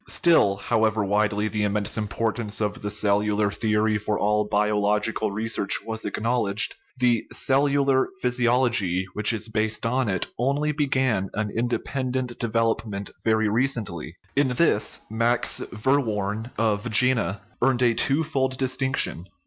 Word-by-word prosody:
Still, 160 - +3
however 110 +1 0
widely 105 +1 +1
the 105 0 -2
immense 105 0 -1
importance 110 0 -2
of 105 -2 -2
the 105 - -3
cellular 105 0 +1
theory 110 0 +1
for 105 0 -2
all 105 +1 +1
biological 105 +1 +1
research 110 -1 0
was 110 -1 -4
acknowl 115 -1 -1
edged, 100 +1 +2 0.2
the 120 -3 +1
" - - -29
cellular 140 -1 +2
physiology 120 - +2
" - - -28
which 105 +2 +3
is 110 -1 -3
based 110 0 -1
on 125 0 0
it 95 -2 0
only 140 +4 +1
began 130 -9 0
an 105 0 -2
independent 125 +2 -2
development 115 -3 -1
very 110 -1 +2
recently. 105 - -1 0.2
In 140 0 +3
this 125 -3 +1
Max 115 +2 +1
Verworn 110 -3 -1
(of 110 +1 0
Jena) 115 -5 +2 0.2
earned 125 0 +2
a 120 -1 +4
twofold 135 -1 0
dis 130 -1 -1
tinction. 130 -9 0
110 Hz, 140 wpm, -24 LUFS, 105-125 Hz, 0.2 s, a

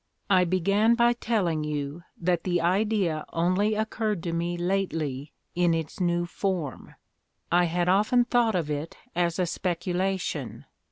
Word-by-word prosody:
"I 185 -2 +5
began 200 +6 +3
by 240 0 +4
telling 195 -10 0
you 150 +1 -3 0.2
that 175 -1 0
the 175 -2 +1
idea 185 -2 +1
only 185 +6 +2
occurred 215 -3 -1
to 170 - -2
me 170 +1 -1
lately 165 -7 -2 0.2
in 175 -1 +2
its 160 +2 -4
new 175 -1 +1
form. 175 -5 -3 0.6
I 175 +1 +4
had 175 +1 0
often 215 +6 +4
thought 240 -4 +2
of 160 -4 -1
it 150 +2 -4 0.2
as 170 -1 +1
a 185 - +1
speculation. 175 - -2
175 Hz, 145 wpm, -27 LUFS, 165-200 Hz, 0.6 s, I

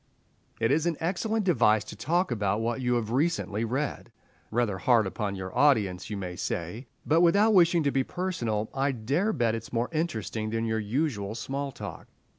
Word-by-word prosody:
It 115 +2 +2
is 155 +4 +2
an 165 -3 0
excellent 210 +5 -1
device 110 - +4
to - - -9
talk 170 - 0
about 105 -3 0
what 115 +3 -1
you 125 -1 +1
have 115 -2 -1
recently 130 - 0
read. 125 +1 -3 0.4
Rather 110 -4 0
hard 115 -2 +4
upon 100 +1 -3
your 95 -1 -6
audience, 105 -11 +2
you 105 - -3
may 90 -2 -5
say; 90 +10 -4 0.2
but 160 +3 +4
without 200 +6 +5
wishing 170 -3 +5
to 140 - +2
be 135 -1 +1
personal, 120 - -2
I 135 +1 0
dare 140 - 0
bet 120 - +1
it 115 - -2
is - - -13
more 120 +1 -1
interesting 115 - -2
than 115 +1 -1
your 110 -1 0
usual 110 -2 -2
small 135 +4 -3
talk. - - -8
120 Hz, 190 wpm, -28 LUFS, 110-155 Hz, 0.4 s, without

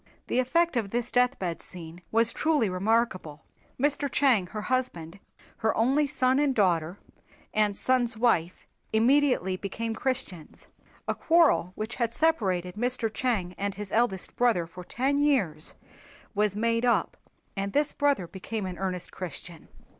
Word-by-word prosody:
The 250 - 0
effect 335 +6 +2
of 220 -4 -1
this 240 +3 -2
deathbed 245 -9 +1
scene 170 -1 -9
was 230 +1 +4
truly 300 -11 +1
remarkable. 185 -6 0 0.4
Mr. 285 +1 +1
Chang 250 -11 +3
her 210 +3 -6
husband, 200 -10 -2 0.4
her 220 - 0
only 270 +6 +3
son 260 0 +2
and 285 -3 +2
daughter 175 -3 +1 0.6
and 210 -2 +1
son's 250 -3 +1
wife 185 -7 +1 0.3
immediately 235 -5 +3
became 225 +4 -4
Christians. 225 - -4 0.4
A - - +1
quarrel 320 - +3
which 220 +2 -5
had 235 -2 -1
separated 190 - +1
Mr. 235 0 -1
Chang 215 -9 -1
and 200 0 -2
his 205 0 -6
eldest 220 -5 0
brother 230 -9 +2
for 175 +2 -11
ten 270 +9 0
years 205 - +1 0.6
was 210 -1 +1
made 230 +2 0
up 245 -1 +1 0.4
and 200 0 -2
this 290 +4 +1
brother 285 -10 +1
became 195 +4 -5
an 180 -1 -6
earnest 185 -2 -3
Christian. 175 -2 -8
225 Hz, 145 wpm, -27 LUFS, 185-255 Hz, 0.6 s, was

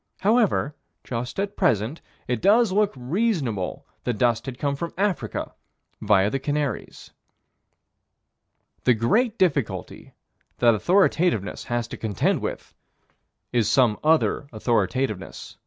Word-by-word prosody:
However, 210 - +2 0.3
just 125 +6 -4
at 200 +1 -2
present, 125 - +1 0.3
it 120 -3 -1
does 220 +1 +4
look 205 +1 +2
reasonable 135 - -1 0.2
that 120 -3 -2
dust 120 +1 +1
had 130 -2 -5
come 140 +1 -1
from 170 +4 -5
Africa, 195 -2 -2 0.5
via 100 -1 +3
the 135 - -1
Canaries. 145 0 -3 1.7
The 125 - +5
great 215 - +1
difficulty 140 - -1 0.4
that 120 -1 +5
authoritativeness 170 - +1
has 120 -1 -2
to - - -7
contend 105 -4 0
with - - -5 0.8
is 120 -3 +2
some 120 -5 +3
other 155 -2 +2
authoritativeness. 110 -1 -2
130 Hz, 115 wpm, -24 LUFS, 115-180 Hz, 1.7 s, The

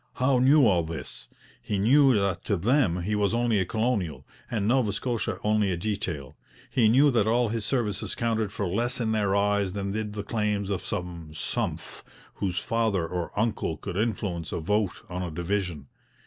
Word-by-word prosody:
Howe 130 0 +2
knew 135 +2 +6
all 90 -6 +4
this; 80 -6 -6 0.3
he 105 - -2
knew 130 +4 +5
that 100 -2 -1
to 100 - +1
them 95 - +2
he 105 +4 -1
was 105 +1 +1
only 120 -3 +2
a 95 - +1
colonial, 110 -6 -1 0.2
and 105 -4 -1
Nova 120 -3 +3
Scotia 120 +1 -2
only 105 -1 +2
a 90 - -1
detail; 90 -8 -3 0.4
he 115 -4 +4
knew 140 +5 +5
that 110 -4 +2
all 120 +1 +2
his 110 -1 -2
services 105 -5 -1
counted 110 -3 0
for 105 - -3
less 115 +9 -1
in 115 -2 0
their 105 -3 +1
eyes 100 -2 +1
than 100 -1 -3
did 105 0 -3
the 105 -1 -4
claims 105 -2 -1
of 95 - -1
some 85 -3 -5
'sumph' - - -3 0.3
whose 90 -3 -3
father 110 -6 0
or 85 0 -3
uncle 105 -7 0
could 95 +3 -6
influence 95 -6 -2
a - - -2
vote 105 +3 -1
on 90 0 -4
a 90 - -3
division. 85 -2 -2
105 Hz, 185 wpm, -27 LUFS, 90-115 Hz, 0.4 s, knew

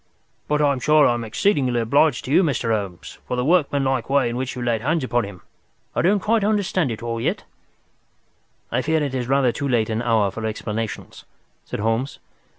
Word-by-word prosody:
But 150 0 +1
I'm 140 -2 +2
sure 150 +2 +4
I - - +4
am 120 -1 -3
exceedingly 125 - +1
obliged 135 +4 +2
to 130 - -5
you, 170 - +5
Mr. 135 -9 0
Holmes, 100 -5 -5
for 125 - -2
the 125 - 0
workmanlike 140 -6 +1
way 140 -3 +2
in 120 - -4
which 130 +1 -3
you 125 - -4
laid 115 -2 0
hands 155 +4 0
upon 120 -3 0
him. 100 -3 -10 0.5
I - - +2
don't 200 +4 +3
quite 220 +2 +1
understand 195 -7 +1
it 115 0 -5
all 115 -1 -3
yet." - - -1 1.3
"I 125 - +1
fear 160 +2 +1
it 140 -2 -3
is 125 -2 -2
rather 135 -2 +3
too 140 +3 -3
late 115 -4 +1
an 110 +1 -1
hour 110 -5 +2
for 110 +3 -7
explanations," 110 0 -5 0.4
said - - -5
Holmes. 115 +5 -1
125 Hz, 200 wpm, -22 LUFS, 115-150 Hz, 1.3 s, you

